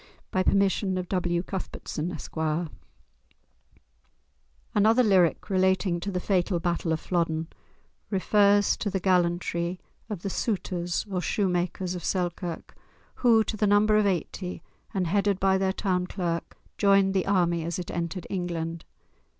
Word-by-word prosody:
By 185 - +1
permission 195 0 +2
of 180 -1 -3
W. 175 -2 0
Cuthbertson, 180 -3 -5
Esq. - - -8 2.4
Another 220 +4 +4
lyric, 185 -6 +3
relating 190 -2 +2
to 200 - -4
the 180 - -1
fatal 180 -1 +1
battle 170 -1 -1
of 160 - 0
Flodden, 165 -2 -1 0.6
refers 205 0 +3
to 205 - -2
the 190 - -1
gallantry 175 -1 0 0.3
of 200 -5 -5
the 195 - -2
Souters, 180 -5 -2
or 190 -3 -2
shoemakers 180 -1 -1
of 180 - -6
Selkirk, 175 -2 -3 0.4
who, 230 -3 +5
to 220 - -4
the 210 0 +1
number 210 +1 +4
of 210 -1 +4
eighty, 180 0 -3 0.3
and 190 -2 -1
headed 200 +2 +1
by 190 0 +3
their 190 0 +1
town 185 -2 -1
clerk, 170 -3 -3 0.2
joined 195 -1 +4
the 190 -2 0
army 175 -4 +2
as 170 0 -3
it 180 - -5
entered 170 +1 -3
England. 170 -3 -3
185 Hz, 140 wpm, -27 LUFS, 175-200 Hz, 2.4 s, who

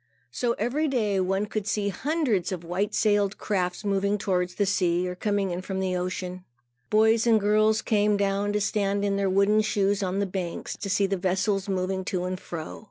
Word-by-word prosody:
So 240 -1 0
every 295 +8 -1
day, 215 -8 0
one 195 +2 0
could 210 -1 -4
see 205 -1 0
hundreds 255 - 0
of 180 -2 -4
white 180 +5 -2
sailed 205 -2 +2
craft 180 -1 -2
moving 200 +1 +1
towards 180 -3 -1
the 205 - +1
sea, 180 -3 +1
or 180 - -3
coming 200 0 -1
in 175 +1 -3
from 190 0 -4
the 185 -1 -1
ocean. 180 0 -4 0.5
Boys 220 +2 +4
and 225 -2 +5
girls 215 +2 +3
came 210 -1 +2
down 200 +1 0
to 210 - 0
stand 200 0 0
in 200 -1 +1
their 200 -1 +1
wooden 200 +3 +3
shoes 205 -1 +1
on 190 0 -1
the 200 - +1
banks, 180 -3 -4
to 200 - -6
see 200 +1 +2
the 195 0 -1
vessels 190 +2 0
moving 190 0 -1
to 185 -3 -2
and 185 0 -3
fro. 160 -4 -7
200 Hz, 200 wpm, -26 LUFS, 185-210 Hz, 0.5 s, and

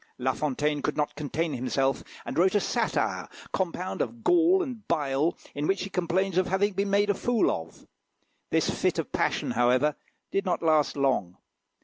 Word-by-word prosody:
La 130 +1 0
Fontaine 150 +1 -1
could 150 - -2
not 150 -1 0
contain 155 +2 -2
himself, 135 +1 0 0.2
and - - -5
wrote 185 +5 +3
a - - +5
satire, - - -1 0.3
compound 185 0 -2
of 235 -1 -4
gall 355 +2 +4
and 245 - -7
bile, 150 -1 +1 0.2
in 145 +1 -2
which 195 -1 +1
he 195 - -6
complains 185 +1 +1
of 185 - +1
having 195 +2 +1
been 200 +2 -1
made 205 +1 +3
a - - +1
fool 235 +3 +1
of. 80 0 -6 0.6
This - - +2
fit - - 0
of - - -3
passion, - - 0
however, 125 +5 +3 0.4
did 195 - +1
not 180 -3 -1
last 155 -3 +3
long. 130 -10 0
170 Hz, 175 wpm, -27 LUFS, 145-195 Hz, 0.6 s, a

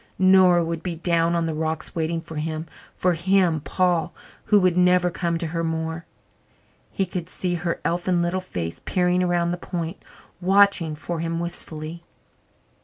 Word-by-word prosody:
Nora 185 -2 +5
would 165 0 -3
be 175 -2 -4
down 170 0 +1
on 170 -1 +1
the 160 - -2
rocks 160 +1 -2
waiting 165 0 -1
for 160 -1 -9
him 155 +1 -3 0.3
for 180 -1 +2
him, 175 -1 +2
Paul, 175 +1 0 0.3
who 210 - +5
would 185 -2 +3
never 180 0 +4
come 170 -1 -1
to 170 - -3
her 165 +1 -2
more. 160 0 -3 0.8
He 195 - 0
could 180 -1 -5
see 180 -1 -2
her 170 0 -2
elfin 175 +1 +1
little 175 +2 0
face 85 - -5
peering 180 0 +1
around 175 -1 +1
the 175 - -2
point, 175 0 -5 0.4
watching 190 -4 +4
for 165 +2 -5
him 165 0 -2
wistfully. 170 -1 -5
170 Hz, 165 wpm, -24 LUFS, 165-180 Hz, 0.8 s, Nora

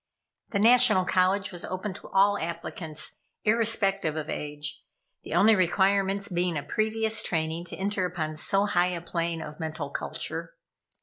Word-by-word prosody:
The 200 - -1
National 230 -3 +6
College 190 +2 +2
was 175 -2 -7
open 185 +2 -4
to - - -10
all 200 +1 +4
applicants, 160 -1 -4 0.2
irrespective 210 -7 +1
of 155 -1 -4
age, 150 0 -5 0.4
the - - -5
only 220 +2 +6
requirements 195 +2 +2
being 175 -2 -1
a 145 - -3
previous 220 0 0
training 160 -1 -2
to 175 - -7
enter 195 0 -1
upon 160 -3 -4
so 195 +6 +1
high 180 -3 +2
a 170 - -5
plane 170 -1 -2
of 150 0 -9
mental 155 -3 -4
culture. - - -4
185 Hz, 150 wpm, -27 LUFS, 165-205 Hz, 0.4 s, National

